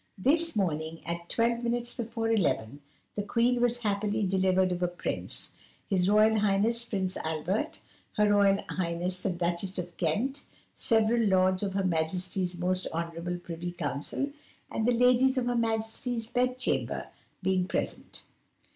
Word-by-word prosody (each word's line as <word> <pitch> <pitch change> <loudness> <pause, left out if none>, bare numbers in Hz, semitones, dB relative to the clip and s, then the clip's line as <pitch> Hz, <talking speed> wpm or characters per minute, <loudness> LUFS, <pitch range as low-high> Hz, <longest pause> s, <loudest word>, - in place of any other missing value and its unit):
"This 320 - +2
morning, 165 -4 -2
at 170 0 -4
twelve 235 +1 +1
minutes 240 0 -1
before 225 -1 -2
eleven, 145 - 0 0.3
the 205 - -1
Queen 235 +4 +1
was 245 0 +2
happily 210 0 0
delivered 185 0 +2
of 180 0 -2
a 180 - +3
Prince, 175 0 -4 0.4
his 185 -2 +2
Royal 215 +1 +5
Highness 210 +3 +2
Prince 190 -5 -1
Albert, 160 +6 -2 0.3
her 210 -1 +3
Royal 200 -1 +4
Highness 180 +1 -2
the - - 0
Duchess 175 +2 -2
of 180 -1 -4
Kent, 245 - -1 0.3
several 225 0 +3
Lords 185 -3 +3
of 195 -2 -2
Her 195 - +1
Majesty's 180 +2 0
Most 180 +1 0
Honourable 170 +1 -3
Privy 175 0 -6
Council, 165 - -3 0.4
and 220 - 0
the - - +5
Ladies 250 +2 +4
of 250 - +1
Her 245 0 0
Majesty's 225 +1 -1
Bed 250 +2 0
chamber, 255 - -1 0.3
being 185 -1 +1
present. - - -3
195 Hz, 145 wpm, -29 LUFS, 180-230 Hz, 0.4 s, Royal